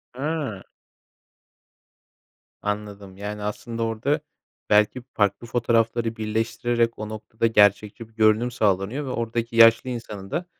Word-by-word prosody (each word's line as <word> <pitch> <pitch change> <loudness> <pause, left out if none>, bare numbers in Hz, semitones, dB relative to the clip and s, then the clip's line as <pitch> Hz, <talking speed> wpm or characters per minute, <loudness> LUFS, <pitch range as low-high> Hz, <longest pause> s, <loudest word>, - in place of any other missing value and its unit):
Hıı. 140 -7 -3 2.0
Anladım. 105 -2 -5
Yani, 105 +1 -5
aslında 115 +2 -4
orada 115 +7 0 0.5
belki 105 +4 +3
farklı 105 +3 0
fotoğrafları 115 -1 +1
birleştirerek 115 +2 -1
o 105 0 -5
noktada 110 +1 -2
gerçekçi 105 +1 +2
bir - - -27
görünüm 110 +2 +3
sağlanıyor 105 +5 0
ve - - -5
oradaki 115 -1 -3
yaşlı 115 +2 +6
insanın 105 -5 -7
da, 175 - -2
115 Hz, 115 wpm, -24 LUFS, 105-120 Hz, 2.0 s, yaşlı